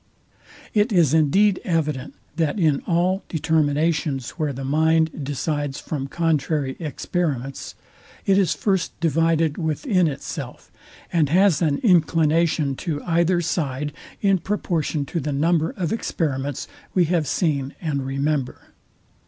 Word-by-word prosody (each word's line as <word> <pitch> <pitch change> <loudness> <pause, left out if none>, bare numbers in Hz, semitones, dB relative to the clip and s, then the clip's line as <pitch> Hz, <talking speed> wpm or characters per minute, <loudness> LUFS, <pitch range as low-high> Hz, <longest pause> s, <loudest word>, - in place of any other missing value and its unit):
It 215 +2 +2
is 170 -7 +4
indeed 185 +6 +4
evident, 150 -6 -1 0.2
that 165 +4 0
in 155 -5 +2
all 180 +3 +1
determinations, 150 -3 0
where 155 -4 -2
the 135 0 -6
mind 160 +2 +2
decides 145 0 -2
from 140 -3 -4
contrary 150 -3 0
experiments, 145 -4 -3 0.5
it 195 - +4
is 190 - +2
first 190 -4 -1
divided 165 -1 +1
within 175 - +1
itself, 145 - -6 0.4
and 160 -5 +3
has 180 -1 +4
an 150 -4 +2
inclination 165 - +3
to 150 -4 -3
either 170 +1 +2
side 150 -3 -2 0.3
in 195 -2 +4
proportion 165 -7 -1
to 170 - -3
the 150 0 -3
number 160 +3 +2
of 175 -1 -3
experiments 145 - -2 0.3
we 180 -2 +4
have 165 -2 0
seen 140 -4 -1
and 145 -4 -2
remember. 140 0 -2
160 Hz, 125 wpm, -23 LUFS, 145-170 Hz, 0.5 s, is